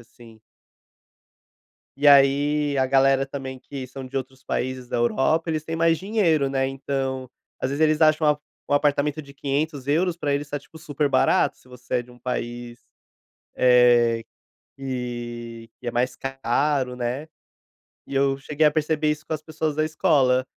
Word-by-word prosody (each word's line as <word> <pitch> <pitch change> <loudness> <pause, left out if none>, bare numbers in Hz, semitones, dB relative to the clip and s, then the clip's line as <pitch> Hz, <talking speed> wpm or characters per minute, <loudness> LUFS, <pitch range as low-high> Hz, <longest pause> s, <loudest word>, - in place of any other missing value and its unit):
assim. 115 -1 -17 1.6
E, 145 - +1
aí, 145 +1 +4
a 130 - +3
galera 135 0 +3
também, 135 -1 -6
que 135 0 -8
são 135 +1 -9
de 135 +2 -7
outros 130 0 -5
países 130 0 -3
da - - -2
Europa, 135 +7 +1
eles 155 -1 -2
têm 165 +1 -4
mais 165 0 +3
dinheiro, 180 -9 +1
né, 135 0 0
então, 135 -1 -3 0.3
às 130 - -1
vezes, 140 +2 -3
eles 155 0 +3
acham 155 -1 +4
um - - -14 0.3
um 145 - +4
apartamento 145 +1 +1
de 140 - -14
€500,00 145 +4 -1
pra 150 -4 -3
eles 145 +1 -2
está 145 0 -4
tipo 145 - -18
super 150 -2 -2
barato, - - +2
se - - -25
você 125 0 -8
é 120 - +2
de 125 +1 -17
país, 120 -1 -5 0.8
eh, 120 -2 +4 0.5
que 120 -3 -6
que 120 - -9
é - - +2
mais 125 +1 0
caro, 135 0 -1
né, 125 +5 -3 0.8
e - - -7
eu 135 0 +2
cheguei 150 +3 0
a - - +6
perceber 155 0 0
isso 150 +1 -3
com - - -5
as 155 - -2
pessoas 155 -1 -3
da 155 - +1
escola, 130 -5 +2
135 Hz, 165 wpm, -24 LUFS, 125-150 Hz, 1.6 s, a